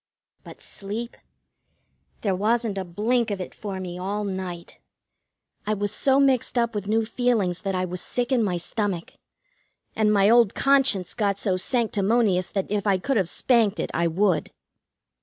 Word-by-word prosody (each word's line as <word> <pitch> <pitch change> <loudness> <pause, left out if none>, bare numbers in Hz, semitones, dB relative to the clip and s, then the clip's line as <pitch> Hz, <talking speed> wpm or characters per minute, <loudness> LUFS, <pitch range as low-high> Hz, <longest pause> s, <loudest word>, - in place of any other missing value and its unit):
But - - -13
sleep? 215 +4 -6 1.1
There 200 -3 0
wasn't 215 +1 0
a - - -2
blink 220 +7 0
of 200 -2 -3
it 185 - -6
for 195 -3 -6
me 180 -1 -6
all 200 +3 -3
night. 185 -3 -6 0.9
I 215 - +1
was 205 0 -1
so 270 +4 +3
mixed 265 -3 +2
up 235 -1 +1
with 205 -2 -4
new 220 +1 +1
feelings 220 -7 0
that 195 -2 -2
I 185 0 0
was 180 0 -5
sick 245 +1 -2
in 255 -3 +3
my 185 -5 0
stomach, 185 -1 -3 0.8
and 215 -1 +2
my 200 -1 +4
old 230 -2 +4
conscience 270 -9 +2
got 200 -4 0
so 195 -2 0
sanctimonious 205 -2 +1
that 195 -1 -3
if 210 0 -1
I 195 -2 +3
could 270 +9 -2
have 185 -4 +1
spanked 225 -4 +2
it - - -3
I 170 +1 +1
would. 175 -1 +1
205 Hz, 170 wpm, -24 LUFS, 185-230 Hz, 1.1 s, my